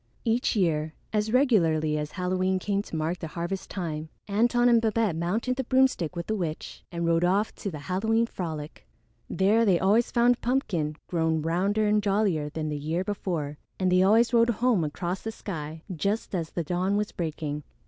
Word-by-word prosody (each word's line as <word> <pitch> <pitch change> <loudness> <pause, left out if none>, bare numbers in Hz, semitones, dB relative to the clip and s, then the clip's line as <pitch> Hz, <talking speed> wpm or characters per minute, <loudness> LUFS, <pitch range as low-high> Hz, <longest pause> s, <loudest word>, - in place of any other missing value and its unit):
Each 235 +2 +1
year, 160 -5 0 0.2
as 215 0 0
regularly 165 - +3
as 150 0 -3
Halloween 185 +1 0
came 200 +1 -1
to 205 - -8
mark 160 +3 -1
the 165 - -5
harvest 170 +4 -4
time, 160 -4 -4 0.2
Antone 240 +4 +3
and 235 -2 +5
Babette 220 -5 +1
mounted 215 +10 -1
the 265 - -1
broomstick 260 - +2
with 170 0 -4
the 220 - -2
witch 165 -6 -4
and 170 -1 -2
rode 165 0 +2
off 195 +4 +2
to 200 - -4
the 160 - -6
Halloween 220 +5 +1
frolic. 160 -8 -6 0.4
There 210 +4 +3
they 195 -6 +4
always 210 +5 +3
found 240 0 +3
Pumpkin 185 - 0
grown 160 -2 0
rounder 195 +6 +1
and 210 0 +3
jollier 195 -7 +1
than 155 0 -4
the 150 -1 -3
year 160 +5 -1
before, 170 -8 -3 0.2
and 185 -1 +2
they 185 0 +5
always 225 +6 +4
rode 235 0 +5
home 235 -5 +2
across 175 +5 -3
the 225 - -4
sky 160 -7 -6
just 200 +8 -2
as 165 -4 -2
the 170 - -3
dawn 180 +5 0
was 210 0 -1
breaking. 155 -3 -4
185 Hz, 185 wpm, -27 LUFS, 160-220 Hz, 0.4 s, and